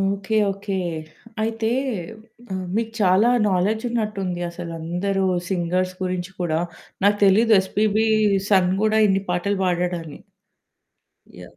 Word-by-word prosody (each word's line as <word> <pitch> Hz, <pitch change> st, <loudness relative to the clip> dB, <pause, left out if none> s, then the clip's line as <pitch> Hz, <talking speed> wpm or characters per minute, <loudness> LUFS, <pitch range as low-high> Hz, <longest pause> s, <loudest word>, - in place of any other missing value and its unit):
Okay. 195 Hz, +2 st, -1 dB, 0.2 s
Okay. 200 Hz, 0 st, -4 dB, 0.7 s
అయితే 225 Hz, 0 st, -1 dB, 0.8 s
ఆహ్, 185 Hz, -1 st, -3 dB
మీకు 225 Hz, 0 st, -1 dB
చాలా 195 Hz, +4 st, +4 dB, 0.2 s
నాలెడ్జ్ 200 Hz, +5 st, 0 dB
ఉన్నట్టుంది. 200 Hz, -6 st, -2 dB
అసలందరూ 175 Hz, +4 st, -3 dB, 0.2 s
సింగర్స్ 185 Hz, 0 st, -1 dB
గురించి 185 Hz, +1 st, -3 dB
కూడా, 160 Hz, -2 st, 0 dB, 0.5 s
నాకు 205 Hz, 0 st, +4 dB
తెలీదు 220 Hz, +3 st, +5 dB
'ఎస్‌పీబీ' 215 Hz, +3 st, +1 dB, 0.4 s
సన్ 185 Hz, -2 st, +4 dB
గూడా 220 Hz, 0 st, +3 dB
ఇన్ని 195 Hz, 0 st, +1 dB
పాటలు 190 Hz, +3 st, 0 dB
పాడాడని. 175 Hz, -3 st, -2 dB, 1.2 s
యాహ్! -, -, -13 dB
195 Hz, 110 wpm, -22 LUFS, 180-210 Hz, 1.2 s, తెలీదు